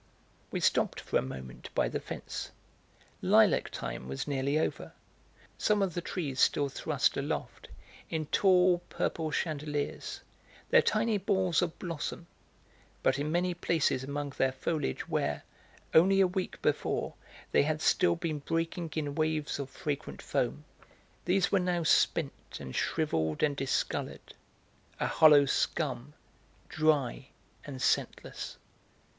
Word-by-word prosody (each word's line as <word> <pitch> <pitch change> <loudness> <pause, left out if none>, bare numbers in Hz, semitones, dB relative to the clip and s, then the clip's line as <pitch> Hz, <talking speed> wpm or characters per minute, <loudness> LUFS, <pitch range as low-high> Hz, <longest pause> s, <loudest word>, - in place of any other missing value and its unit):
We - - -2
stopped - - +2
for - - 0
a - - +2
moment 65 -1 -8
by - - +3
the - - -2
fence. - - -6 0.7
Lilac - - +4
time 65 - -5
was 65 0 -4
nearly 140 +1 0
over; 160 - -2 0.7
some 210 -2 +3
of 185 -3 -1
the 175 - -2
trees 150 -7 -4
still 145 -1 +3
thrust - - 0
aloft, - - -4 0.4
in 160 -1 -2
tall 180 +1 +4
purple 160 -1 -1
chandeliers, 150 -2 -3 0.5
their - - +7
tiny 220 -1 +1
balls 190 -4 +2
of 175 -2 -2
blossom, 170 0 -5 0.8
but - - +2
in 150 +2 -1
many 175 +2 +1
places 160 -6 +1
among 140 +1 -3
their 135 0 +3
foliage 130 - -2
where, 75 0 -1 0.5
only 190 +4 +6
a 195 - +6
week 185 0 -3
before, - - 0 0.4
they - - +5
had 155 +2 0
still 175 +2 +3
been 165 -3 -3
breaking 165 +3 -2
in 145 -3 -2
waves 155 -1 -1
of 140 -1 -4
fragrant 150 -2 -4
foam, 70 +4 -2 0.6
these 185 +2 +2
were 195 - +4
now 180 -2 0
spent 155 -1 +1
and 65 - -7
shrivelled 80 - 0
and 145 -2 +2
discoloured, 135 -1 -2 0.7
a - - 0
hollow 150 -3 +7
scum, 140 0 -1 0.5
dry 145 -4 +1 0.4
and 135 -3 -6
scentless. - - -1
155 Hz, 135 wpm, -30 LUFS, 140-175 Hz, 0.8 s, their